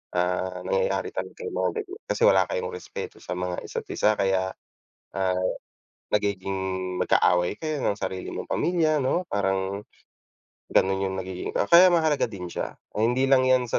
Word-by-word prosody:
ah, 90 +1 0
nangyayari 485 0 0
talaga 470 - -6
yong 445 - -5
mga - - +1
ganiyan 390 +2 -11
kasi - - -1
wala - - +5
kayong 475 -1 -3
respeto 455 0 -7
sa - - -5
mga 90 0 -3
isa't - - -5
isa 105 0 +2
kaya, 95 -1 +1 0.7
ah, 95 -1 +1 0.7
nagiging 100 -2 0 0.5
magkaaway 90 +2 +3
kayo 155 -2 -2
ng - - +1
sarili 95 -1 -4
mong - - -6
pamilya 160 -3 +2
'no, 130 +7 +1
parang 95 0 -1 0.9
gano'n 95 +1 +3
yung 95 - -3
nagiging 95 -1 -5
ah, 100 - +1
kaya 180 +1 +8
mahalaga 155 -5 +2
din 95 -5 -7
siya. - - -4 0.2
Hindi 125 +5 +2
lang 130 -1 +6
yan 130 -2 +3
sa - - +2
105 Hz, 160 wpm, -26 LUFS, -, 0.9 s, kaya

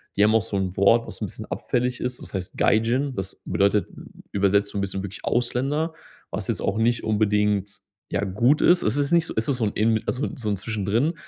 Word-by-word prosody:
die 100 - +4
haben 110 +1 +4
auch 115 - +4
so 110 -2 -5
'n 95 -2 -2
Wort, 115 +4 +4
was - - -6
'n - - 0
bisschen - - -7
abfällig 125 0 -1
ist. 125 0 -3
Das - - -9
heißt 95 -2 -5
Gaijin, 120 +6 +2
das 95 -1 -6
bedeutet 100 +1 +2
ü - - -12 0.3
übersetzt 100 +1 +2
so - - -5
'n - - 0
bisschen 95 0 -2
wirklich 100 +1 -8
Ausländer, 135 +7 0 0.4
was - - -4
jetzt - - -2
auch 100 - -1
nicht 120 +1 +1
unbedingt, 105 -1 +1 0.3
ja, 100 - 0
gut 115 +9 +2
ist. 175 0 +5
Es 110 +6 +1
ist 145 +1 0
nicht 170 -1 +4
so - - -5
es 110 - +1
ist 140 - +1
so 115 - 0
'n 105 - 0
ähn 110 0 +2
also 130 +4 -1
so 115 -4 -4
'n 100 - 0
Zwischendrin 110 - 0
110 Hz, 235 wpm, -24 LUFS, 100-125 Hz, 0.4 s, ist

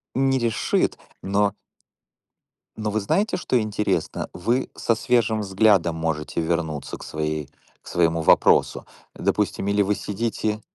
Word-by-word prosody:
Не 135 0 +2
решит, 115 -2 0 0.2
но 100 +1 +1 1.2
но 110 -1 -2
вы 110 - 0
знаете, 200 - 0
что 130 -8 +1
интересно? 105 0 -2
Вы 120 +9 -1
со 115 - +1
свежим 115 -2 +1
взглядом 95 -4 +3
можете 80 0 -2
вернуться 80 -3 -2
к - - -11
своей 75 -2 -3 0.3
к - - -20
своему 85 -1 +1
вопросу. 80 - +4 0.3
Допустим, 100 - -1
или 100 0 +2
вы 100 +1 +1
сидите 105 +1 -2
100 Hz, 130 wpm, -23 LUFS, 85-110 Hz, 1.2 s, вопросу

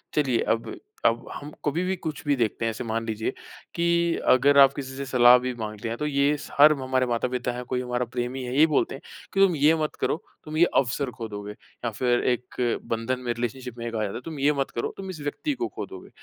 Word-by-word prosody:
चलिए 135 -6 +2
अब 115 - -5 0.3
अब 115 +1 +3
हम 150 +1 -8
कभी-भी, 180 +6 0
कुछ-भी 150 -4 -2
देखते 115 -1 -1
हैं - - +2
ऐसे 115 - -4
मान 115 0 -2
लीजिए 110 -1 -2 0.4
कि 170 - 0 0.5
अगर 140 +3 +4
आप 135 0 +4
किसी 130 -2 -6
से 140 - -4
सलाह 125 0 +8
भी 125 - -1
माँगते 110 +1 -4
हैं 115 - -3
तो 150 - -2
ये 140 0 +2
स 145 - -10
हर 150 +1 +9
हमारे 130 0 +1
माता-पिता 125 +1 -1
हैं, 125 +1 -5
कोई 125 0 -2
हमारा 125 0 -1
प्रेमी 125 +2 -2
है 125 0 -4
यही 155 +2 +7
बोलते - - +1
हैं - - -11 0.3
कि 195 - 0
तुम 190 -4 +5
ये 150 +3 +4
मत 155 -1 -2
करो, - - +1 0.3
तुम 155 +1 -5
ये 175 - +6 0.2
अवसर 125 +1 -3
ख़ो 115 -2 -4
दोगे 105 0 -7
या 120 +2 -7
फ़िर 120 +2 +1
एक 125 -1 -2
बंधन 120 +3 -1
में 120 - 0
रिलेशनशिप 120 +1 -5
में 115 0 -4
कहा 110 -2 -1
जाता 100 - -3
है 125 - -5
तुम 155 -3 -6
ये 145 +2 +3
मत 135 - -1
करो, 115 - -2
तुम 190 -1 -6
इस 160 -5 -7
व्यक्ति 215 - -2
को - - 0
ख़ो - - -3
दोगे। - - -11
125 Hz, 235 wpm, -26 LUFS, 120-145 Hz, 0.5 s, हर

